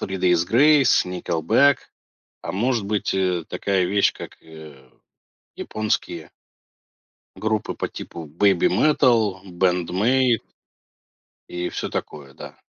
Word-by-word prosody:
Three 95 Hz, 0 st, -4 dB
Days 90 Hz, -2 st, +2 dB
Grace, 140 Hz, +1 st, +4 dB
Nickelback, 90 Hz, -, +2 dB, 0.6 s
а -, -, -6 dB
может 115 Hz, +1 st, -1 dB
быть, 105 Hz, 0 st, -1 dB
э, 90 Hz, -3 st, -1 dB
такая 95 Hz, -2 st, -1 dB
вещь, 100 Hz, +2 st, +1 dB
как, -, -, -11 dB
э, 75 Hz, -5 st, -14 dB, 0.7 s
японские 110 Hz, 0 st, -3 dB, 1.1 s
группы 110 Hz, -1 st, -2 dB
по -, -, -4 dB
типу 85 Hz, -2 st, -9 dB
Babymetal, 105 Hz, -, +2 dB
Band-Maid. 95 Hz, +8 st, +1 dB, 1.1 s
И 90 Hz, 0 st, -4 dB
всё -, -, -5 dB
такое, 70 Hz, -2 st, -7 dB
да. -, -, -11 dB
95 Hz, 105 wpm, -22 LUFS, 90-115 Hz, 1.1 s, Grace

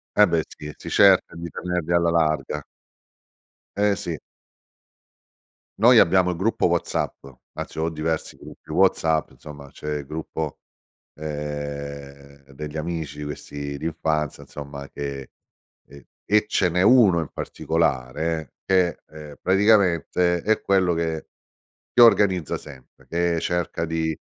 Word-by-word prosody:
E 105 Hz, -, +7 dB
beh 85 Hz, -2 st, +1 dB
sì, 75 Hz, 0 st, -10 dB
si -, -, -9 dB
cerca 95 Hz, -4 st, +5 dB
di 85 Hz, 0 st, -6 dB
tenerli 90 Hz, -1 st, -2 dB
alla 85 Hz, -1 st, +3 dB
larga. 75 Hz, -3 st, 0 dB, 1.1 s
Eh 105 Hz, 0 st, +2 dB
sì. 85 Hz, -4 st, -4 dB, 1.6 s
Noi 120 Hz, +1 st, +7 dB
abbiamo 90 Hz, +1 st, +4 dB
il 90 Hz, -, -3 dB
gruppo 100 Hz, +6 st, +1 dB
WhatsApp. -, -, -2 dB, 0.3 s
Anzi -, -, -6 dB
ho 80 Hz, +1 st, 0 dB
diversi 80 Hz, 0 st, -3 dB
gruppi -, -, -13 dB
WhatsApp, 80 Hz, -3 st, +2 dB
insomma 70 Hz, -2 st, -12 dB
c'è 75 Hz, 0 st, -4 dB
il 70 Hz, -, -8 dB
gruppo, 80 Hz, +1 st, -5 dB, 0.6 s
ehm, 70 Hz, -2 st, -7 dB
degli 75 Hz, +2 st, -7 dB
amici 80 Hz, -2 st, -4 dB
questi 70 Hz, -1 st, -6 dB
d'infanzia, 80 Hz, -1 st, -2 dB
insomma 70 Hz, -1 st, -9 dB
che 70 Hz, -2 st, -6 dB, 0.6 s
e 70 Hz, 0 st, -15 dB, 0.2 s
e 105 Hz, +1 st, +3 dB
ce 90 Hz, -4 st, +2 dB
n'è 90 Hz, +2 st, 0 dB
1 105 Hz, -6 st, +6 dB
in 80 Hz, -, -4 dB
particolare 80 Hz, 0 st, -2 dB
che, 90 Hz, -3 st, +2 dB
ehm, 75 Hz, -1 st, -11 dB
praticamente 90 Hz, -3 st, +3 dB
è 110 Hz, +1 st, +2 dB
quello 95 Hz, -3 st, +2 dB
che 80 Hz, -1 st, -2 dB, 0.7 s
si -, -, +3 dB
organizza 95 Hz, -8 st, +4 dB
sempre, 70 Hz, -4 st, -14 dB
che 85 Hz, 0 st, 0 dB
cerca 85 Hz, 0 st, -1 dB
di 80 Hz, -1 st, -2 dB
80 Hz, 125 wpm, -23 LUFS, 75-90 Hz, 1.6 s, E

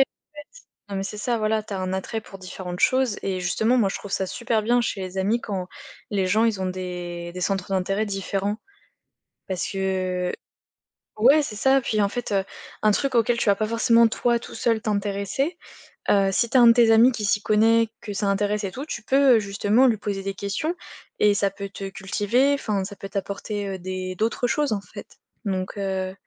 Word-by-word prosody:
fait. -, -, +7 dB, 0.9 s
Non 200 Hz, -, -4 dB
mais 195 Hz, -, -2 dB
c'est 210 Hz, -, -6 dB
ça, 235 Hz, +2 st, -1 dB
voilà, 215 Hz, 0 st, +1 dB
tu 210 Hz, -, -8 dB
as 195 Hz, -, -3 dB
un 185 Hz, -, -2 dB
attrait 190 Hz, +4 st, -3 dB
pour 195 Hz, -, -12 dB
différentes 180 Hz, -1 st, -7 dB
choses 260 Hz, -4 st, +2 dB
et 185 Hz, -2 st, -2 dB
justement 220 Hz, +7 st, +1 dB
moi 210 Hz, -5 st, +3 dB
je -, -, -4 dB
trouve 200 Hz, -, -10 dB
ça 190 Hz, -, 0 dB
super 230 Hz, 0 st, -1 dB
bien 240 Hz, +3 st, +3 dB
chez 225 Hz, -4 st, -2 dB
les 185 Hz, 0 st, -6 dB
amis 210 Hz, +5 st, +1 dB
quand 190 Hz, -4 st, -4 dB, 0.4 s
les 195 Hz, -3 st, 0 dB
gens 215 Hz, +5 st, +3 dB
ils 215 Hz, -4 st, 0 dB
ont 185 Hz, -, -1 dB
des 180 Hz, -2 st, -5 dB
des 180 Hz, -, -6 dB
centres 195 Hz, 0 st, -1 dB
d'intérêt 195 Hz, +3 st, 0 dB
différents. 200 Hz, 0 st, -2 dB, 0.9 s
Parce 185 Hz, -2 st, -3 dB
que 185 Hz, -2 st, -1 dB, 0.9 s
ouais, 275 Hz, +7 st, +6 dB
c'est 215 Hz, -7 st, -6 dB
ça 270 Hz, +3 st, +3 dB
puis 215 Hz, -3 st, 0 dB
en 200 Hz, -, +3 dB
fait, 240 Hz, +1 st, -4 dB
heu, 195 Hz, -1 st, +2 dB, 0.4 s
un 215 Hz, -, +4 dB
truc 270 Hz, +5 st, 0 dB
auquel 235 Hz, +1 st, +3 dB
tu 225 Hz, -, +2 dB
vas -, -, +5 dB
pas 215 Hz, +2 st, -1 dB
forcément 230 Hz, 0 st, +4 dB
toi, 235 Hz, +1 st, +1 dB
tout 235 Hz, -, -11 dB
seul, 230 Hz, -2 st, +1 dB
t'intéresser. 205 Hz, -, -2 dB, 0.5 s
Heu, 195 Hz, -1 st, +4 dB
si 235 Hz, +4 st, +1 dB
tu 260 Hz, -, +3 dB
as -, -, +7 dB
un 240 Hz, -, +8 dB
de 230 Hz, -, +8 dB
tes 230 Hz, -1 st, +5 dB
amis 235 Hz, +3 st, +6 dB
qui 225 Hz, -, -4 dB
s'y 205 Hz, +1 st, +1 dB
connaît, 225 Hz, +2 st, +4 dB
que 210 Hz, -, -6 dB
ça 200 Hz, 0 st, -1 dB
intéresse 205 Hz, +1 st, 0 dB
et 190 Hz, -, -4 dB
tout, 270 Hz, +3 st, -6 dB
tu 215 Hz, -8 st, -6 dB
peux, 270 Hz, +1 st, +5 dB
heu, -, -, +3 dB
justement 205 Hz, +5 st, +2 dB
lui 230 Hz, -, +3 dB
poser 205 Hz, -2 st, -4 dB
des 195 Hz, 0 st, -3 dB
questions 200 Hz, -, -3 dB, 0.4 s
et 210 Hz, -1 st, +5 dB
ça 200 Hz, -1 st, +1 dB
peut 200 Hz, 0 st, -7 dB
te 195 Hz, 0 st, -6 dB
cultiver, 205 Hz, +8 st, +1 dB
enfin, 210 Hz, -8 st, -2 dB
ça 200 Hz, +1 st, -8 dB
peut 195 Hz, -, -7 dB
t'apporter, 200 Hz, +1 st, -4 dB
heu, 190 Hz, -1 st, -5 dB
des 185 Hz, 0 st, -5 dB
d'autres 230 Hz, +4 st, 0 dB
choses 290 Hz, -1 st, +1 dB
en 200 Hz, -, -2 dB
fait. -, -, -11 dB, 0.4 s
Donc, 190 Hz, 0 st, -3 dB
heu 190 Hz, -1 st, -2 dB
205 Hz, 215 wpm, -24 LUFS, 195-230 Hz, 0.9 s, un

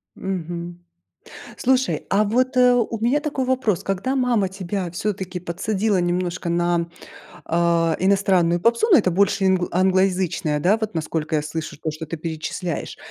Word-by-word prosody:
Мгм. 175 Hz, -2 st, -5 dB, 0.8 s
Слушай, 260 Hz, 0 st, +1 dB
а 210 Hz, +2 st, +3 dB
вот, 255 Hz, +5 st, 0 dB
э, 250 Hz, 0 st, +6 dB
у 235 Hz, -2 st, 0 dB
меня 245 Hz, +7 st, +1 dB
такой 280 Hz, -3 st, -2 dB
вопрос. 250 Hz, -8 st, 0 dB
Когда 200 Hz, +8 st, -1 dB
мама 240 Hz, -6 st, +1 dB
тебя 190 Hz, -1 st, -4 dB
всё-таки 185 Hz, 0 st, -3 dB
подсадила 190 Hz, +3 st, -1 dB
немножко 175 Hz, 0 st, -2 dB
на, 170 Hz, 0 st, +1 dB, 0.6 s
а, 170 Hz, -1 st, +2 dB
иностранную 185 Hz, -3 st, +2 dB
попсу, 235 Hz, -, +2 dB
ну, 340 Hz, -, +9 dB
это 190 Hz, -, +2 dB
больше 195 Hz, +2 st, +2 dB
ингл 185 Hz, -1 st, +2 dB
англоязычная, 185 Hz, -4 st, +1 dB
да, 190 Hz, +8 st, +3 dB
вот 220 Hz, -1 st, -4 dB
насколько 160 Hz, -1 st, -2 dB
я 150 Hz, -, +1 dB
слышу 155 Hz, 0 st, -5 dB
то, 160 Hz, -, -2 dB
что 155 Hz, +1 st, -7 dB
ты 165 Hz, +2 st, -6 dB
перечисляешь, 160 Hz, +1 st, -4 dB
185 Hz, 150 wpm, -22 LUFS, 170-215 Hz, 0.8 s, ну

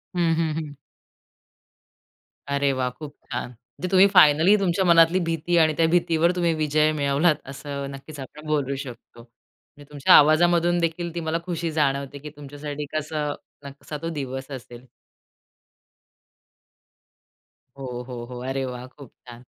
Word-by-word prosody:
हं, 170 Hz, -2 st, +2 dB
हं, 160 Hz, -2 st, 0 dB
हं. 150 Hz, -3 st, -6 dB, 1.7 s
अरे 140 Hz, 0 st, +1 dB
वाह! 130 Hz, -1 st, -1 dB
खूप 145 Hz, +3 st, -11 dB, 0.2 s
छान. 125 Hz, -, -4 dB, 0.3 s
जे 185 Hz, -, -1 dB
तुम्ही 190 Hz, +1 st, +7 dB
फायनली 160 Hz, +4 st, +6 dB
तुमच्या 190 Hz, 0 st, +1 dB
मनातली 170 Hz, +1 st, +5 dB
भीती 165 Hz, +1 st, 0 dB
आणि 155 Hz, -1 st, +4 dB
त्या 165 Hz, -, +4 dB
भीतीवर 170 Hz, 0 st, +2 dB
तुम्ही 170 Hz, -2 st, +1 dB
विजय 155 Hz, 0 st, +2 dB
मिळवलात. 145 Hz, +2 st, +2 dB
असं 140 Hz, 0 st, -6 dB
नक्कीच 140 Hz, +2 st, -10 dB
आपण 150 Hz, +4 st, -10 dB
बोलू 140 Hz, -3 st, 0 dB
शकतो. 130 Hz, -3 st, -10 dB
म्हणजे 140 Hz, +4 st, -22 dB
तुमच्या 145 Hz, -2 st, +3 dB
आवाजामधून 175 Hz, +3 st, +4 dB
देखील 170 Hz, 0 st, -2 dB
ती 170 Hz, -, -2 dB
मला 165 Hz, +1 st, 0 dB
खुशी 170 Hz, -2 st, -3 dB
जाणवते, 140 Hz, -2 st, -1 dB
की 150 Hz, -, -9 dB
तुमच्यासाठी 145 Hz, +1 st, -7 dB
कसं 150 Hz, -1 st, -2 dB, 0.3 s
न 140 Hz, -, -6 dB
कसा 150 Hz, -, -6 dB
तो 165 Hz, -, -3 dB
दिवस 135 Hz, +1 st, -6 dB
असेल. 125 Hz, -1 st, -10 dB, 2.9 s
हो, 135 Hz, -, -7 dB, 0.2 s
हो, 120 Hz, -2 st, -7 dB
हो. 125 Hz, 0 st, -8 dB
अरे 135 Hz, 0 st, -2 dB
वाह! 125 Hz, -1 st, -6 dB
खूप 135 Hz, -1 st, -15 dB, 0.2 s
छान. 120 Hz, 0 st, -11 dB
150 Hz, 145 wpm, -24 LUFS, 140-165 Hz, 2.9 s, तुम्ही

